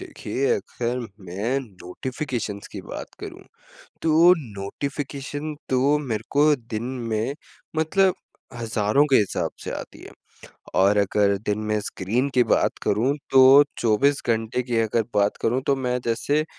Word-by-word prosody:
देखिए 415 - -3
अगर 125 - -3 0.3
मैं 100 +9 -2
नोटिफ़िकेशंस 110 +1 -5
की - - -6
बात - - -8
करूँ, - - -8 0.6
तो 165 +2 +6
नोटिफ़िकेशन 140 +6 -5
तो 135 +3 +3
मेरे 115 -7 -3
को 150 +1 +4
दिन 115 -3 -6 0.3
में 110 +5 -1 0.4
मतलब 185 +4 +3 0.4
हज़ारों 115 +2 +1
के 135 - +6
हिसाब 105 - 0
से - - -4
आती - - -12
है। - - -11 0.6
और 100 +2 +4
अगर 100 0 +2
दिन 105 0 0
में 105 0 +1
स्क्रीन 105 +7 -1
की 125 - +5
बात - - +2
करूँ 115 +7 +1 0.2
तो 135 - +6 0.4
24 135 +6 +2
घंटे 115 +2 0
की 120 -1 -3
अगर 115 +1 +1
बात 100 0 +2
करूँ 125 +3 +1
तो 140 - +3
मैं 125 -1 -1
जैसे 140 +6 0
120 Hz, 140 wpm, -24 LUFS, 105-140 Hz, 0.6 s, तो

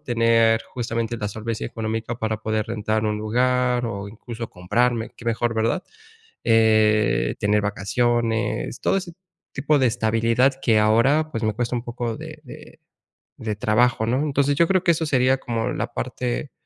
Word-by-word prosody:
tener 115 -3 +3
justamente 115 -1 -2
la 105 - -3
solvencia 110 +2 -4
económica 115 +1 -4
para 110 0 -1
poder 110 0 -1
rentar 110 -1 -1
un 105 0 -1
lugar 125 +2 +1
o 100 -2 -5
incluso 115 +2 -8
comprarme, 115 +6 0
qué 120 - -13
mejor, 115 0 0
¿verdad? 115 +11 0 0.6
Eh, 110 -2 +3
tener 105 0 +2
vacaciones, 115 +3 -1
todo - - +1
ese 180 -3 -7 0.4
tipo 145 +2 +1
de 130 - +3
estabilidad 115 +3 +2
que 110 -3 +3
ahora, 125 +9 +3
pues, 115 - -3
me 110 -1 0
cuesta 120 +1 -2
un 120 - -3
poco 120 -1 -4
de - - -9
de - - -13 0.6
de 110 -2 -3
trabajo, 110 +1 +2
¿no? 125 +3 +1
Entonces, 140 -1 +1
yo 170 +1 +3
creo 185 -1 +2
que 175 - +4
eso 160 0 -2
sería 130 -1 +2
como 120 -1 -2
la 120 +3 -4
parte 125 +2 -3
115 Hz, 160 wpm, -23 LUFS, 110-125 Hz, 0.6 s, que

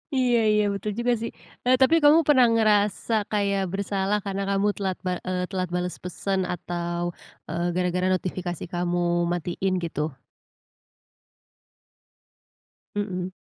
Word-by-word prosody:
Iya 245 -2 +3
iya, 210 0 +3
betul 205 +2 -3
juga, 240 0 +2
sih. 230 - -3 0.3
Eee, 255 +1 +5
tapi 290 +5 +6
kamu 300 +3 +7
pernah 260 -4 +6
ngerasa 215 0 +2 0.2
kayak 200 -2 +1
bersalah 200 +1 0
karena 195 0 -2
kamu 200 +1 +2
telat 190 -2 -2
bal 180 -1 0
eee, 180 0 -1
telat 185 -2 -2
bales 180 0 -2
pesan 190 +2 -2
atau, 175 0 -3 0.3
eee, 170 +2 -1
gara-gara 180 0 +1
notifikasi 180 -2 -2
kamu 175 0 0 0.3
matiin, 175 +2 -1
gitu? 155 -1 -2 2.8
Mmm. 185 -3 -3
190 Hz, 125 wpm, -25 LUFS, 180-210 Hz, 2.8 s, kamu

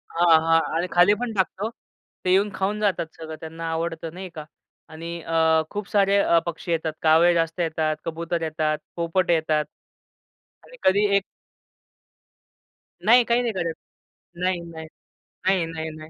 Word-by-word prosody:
हां, 170 -1 +6
हां. 165 0 +4 0.2
आणि 175 +2 0
खालीपण 210 +6 +3
टाकतो. 195 +2 -1 0.6
ते 180 - +2
येऊन 200 +3 +3
खाऊन 195 +2 -1
जातात 190 -5 +1
सगळं. 160 -1 -7
त्यांना 165 +1 -6
आवडत 165 0 -3
नाही 185 +1 -7
का. 155 -1 -7 0.4
आणि 165 +1 -8
अ, 160 -1 +2
खूप 205 -1 -5
सारे 200 -1 +3
अ, 170 -4 +4
पक्षी 170 0 -5
येतात 160 -1 -1
कावळे 165 +2 +5
जास्त 165 +1 -1
येतात, 160 -2 0
कबूतर 165 +1 -3
येतात, 155 -1 -1 0.2
पोपट 170 +2 0
येतात 155 -2 +1 1.0
आणि - - -15
कधी 200 +2 +4
एक 200 - 0 1.8
नाही, 240 +3 +7
काही 235 0 +1
करतं. 175 -5 -2 0.7
नाही, 180 -1 0
नाही. 165 -1 -9 0.6
नाही, 190 -3 +3
नाही, 160 -1 -5
नाही. 155 0 -11
170 Hz, 145 wpm, -24 LUFS, 160-190 Hz, 1.8 s, नाही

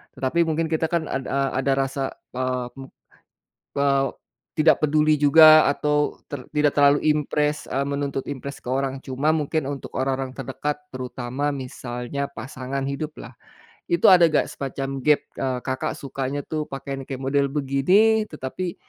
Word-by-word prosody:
Tetapi 165 +6 +1
mungkin 160 0 -1
kita 160 0 +1
kan 170 0 0
ad 130 -1 -3
a 135 0 0
ada 135 +1 +1
rasa, 135 0 -2 0.2
eee, 130 -1 -2
mem 135 - -8 0.9
eee, 140 -1 +2 0.5
tidak 155 0 +4
peduli 155 +1 +3
juga 155 +2 +8
atau, 150 +1 0
ter 140 -3 -6
tidak 150 -1 +2
terlalu 145 0 +5
impress, 150 0 0
e 130 - -3
menuntut 140 -1 -2
impress 140 0 -6
ke - - -10
orang. 135 +1 -1
Cuma 135 +4 0
mungkin 155 -1 -1
untuk 140 0 -6
orang-orang 130 0 -2
terdekat, 135 +2 -3 0.2
terutama 130 +2 -3
misalnya 130 +1 -5
pasangan 135 -1 -5
hidup 145 +3 -4
lah, - - -10 0.6
itu 170 +2 +5
ada 175 -2 +7
nggak 155 - +2
semacam 135 0 -4
gap, 150 +2 +4
eee, 130 -1 -2
Kakak 130 -1 -2
sukanya 135 0 -4
tuh 155 -1 -3
pakaian 135 0 -5 0.2
model 140 +2 +1
begini, 165 +11 +3
tetapi, 160 +5 -5
140 Hz, 150 wpm, -23 LUFS, 135-150 Hz, 0.9 s, juga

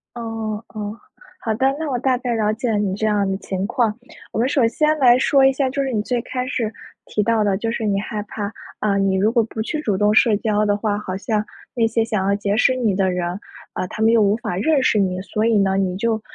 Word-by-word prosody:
哦， 225 -2 -4
哦， 210 0 -6 0.4
好 225 -10 -2
的， 260 +4 +2
那 315 -2 -3
我 255 - 0
大 260 0 +1
概 245 -1 -2
了 215 -1 +1
解 235 +2 -3
了 215 - +1
你 200 -2 0
这 215 +2 -2
样 205 -2 +1
的 195 - -1
情 190 -1 -4
况。 225 -2 0 0.3
我 - - -3
们 250 +3 +2
首 260 -6 +3
先 305 +6 +1
来 245 -2 +6
说 270 0 +4
一 270 - +5
下， 265 0 0
就 275 +1 -1
是 265 - -2
你 210 - +1
最 240 +2 -1
开 250 +2 -4
始 230 -5 -2 0.3
提 210 - -1
到 220 +1 +2
的， 200 -2 +1
就 225 +3 -2
是 230 -1 -3
你 200 -1 +1
害 210 0 -4
怕， 205 0 -5 0.3
啊， 200 -2 +1
你 195 -1 +2
如 210 +4 +2
果 235 -2 +3
不 220 0 -5
去 300 +7 -3
主 205 -8 0
动 210 +1 +3
社 220 0 +5
交 215 -1 +1
的 205 -1 +2
话， 205 0 -1
好 190 -3 -5
像 210 +1 -1 0.3
那 230 -2 +2
些 225 0 +1
想 215 -4 -1
要 200 - +2
结 205 0 -1
识 255 +2 +4
你 230 -6 0
的 190 -1 +1
人， 180 +1 -2 0.3
呃， 185 - -3
他 215 - -7
们 220 +1 +5
又 230 -1 +4
无 205 0 +3
法 215 -7 -4
认 280 +7 +2
识 230 - +2
你。 185 -1 0
所 215 +3 -2
以 230 -2 +3
呢， 195 -1 +2
你 185 -2 0
就 220 +2 -1
215 Hz, 280 characters per minute, -21 LUFS, 200-235 Hz, 0.4 s, 来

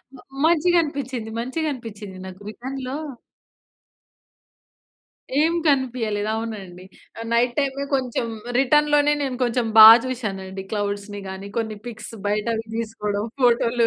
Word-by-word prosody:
మ 255 - -13 0.3
మంచిగనిపించింది, 295 -8 +1
మంచిగా 260 +7 -2
అనిపించింది. 210 -6 -9
నాకు 185 +1 -11
రిటర్న్‌లో 260 +3 -6 2.4
ఏం 320 +2 +3
కనిపియలేదు. 235 -6 0
అవునండి. 195 -5 -6 0.5
నైట్ 240 +1 +2
టైమే 275 -1 0
కొంచెం 250 -2 -1 0.3
రిటర్న్‌లోనే 295 +2 +4
నేను 265 -3 -2
కొంచెం 240 0 0
బాగా 220 +1 +12
చూసానండి. 195 -6 -4
క్లౌడ్స్‌ని 205 0 -3
గాని, 190 +1 -7
కొన్ని 220 -2 -2
పిక్స్ 220 -1 -7 0.2
బయటవి 220 +2 -1
తీసుకోవడం. 210 -2 -3 0.2
ఫోటోలు, 235 -1 +3
235 Hz, 105 wpm, -23 LUFS, 210-265 Hz, 2.4 s, బాగా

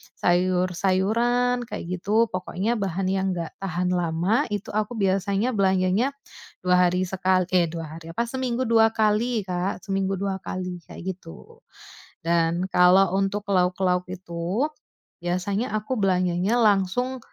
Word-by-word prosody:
sayur-sayuran, 190 +7 +1
kayak - - -5 0.2
gitu, 220 +5 +2
pokoknya 190 +5 -2
bahan 195 -1 -2
yang 190 0 0
enggak 170 -2 -4
tahan 180 -1 -1
lama, 175 +4 +1
itu 205 -2 -4
aku 215 +3 -2
biasanya 195 +3 +1
belanjanya 195 +5 +1 0.5
2 180 0 +4
hari 180 +1 0
sekal 185 0 +1
eh, 180 -2 +3
2 160 -1 -7
hari. 165 0 -11
Apa, 235 - +1
seminggu 255 0 -2
2 225 -2 +4
kali, 220 +1 +1
Kak, 180 0 -3
seminggu 195 -1 -1
2 195 0 -3
kali, 180 -1 -5
kayak - - -10
gitu. 190 - -14 0.6
Dan, 170 +2 +1
kalau 180 +1 +5
untuk 195 +1 -1
lauk-lauk 180 -1 +1
itu, 180 - -2 0.5
biasanya 195 +6 -2
aku 215 +4 -2
belanjanya 185 +1 +1
langsung 215 +5 +2
190 Hz, 130 wpm, -24 LUFS, 180-215 Hz, 0.6 s, kalau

